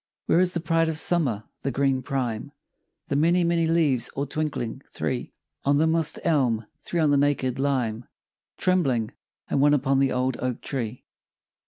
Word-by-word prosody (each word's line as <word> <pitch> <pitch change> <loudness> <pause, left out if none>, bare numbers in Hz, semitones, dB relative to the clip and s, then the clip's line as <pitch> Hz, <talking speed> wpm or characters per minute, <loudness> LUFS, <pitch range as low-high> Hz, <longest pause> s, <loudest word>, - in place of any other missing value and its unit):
Where 170 - +3
is 180 0 +2
the - - +1
pride 165 0 +1
of 160 - -1
Summer, 145 - +2 0.2
the 140 - -1
green 135 -1 +1
prime, 125 -4 -3 0.6
The 140 - 0
many, 170 +5 +3
many 170 -1 +2
leaves 150 -8 +2
all 140 - -1
twinkling? 145 -5 -3
Three 125 -2 -3 0.3
On 140 +1 +3
the 155 - +3
moss'd 160 -1 +2
elm; 125 -9 +1
three 170 +3 -3
on 155 -3 +3
the 145 - +4
naked 135 -2 +1
lime 125 -5 -1 0.5
Trembling, 135 -12 +1 0.4
and 135 - 0
one 145 +1 +5
upon 135 -1 +1
the 135 -1 +2
old 125 0 0
oak 125 -1 -3
tree! 125 -3 -4
140 Hz, 170 wpm, -25 LUFS, 125-160 Hz, 0.6 s, one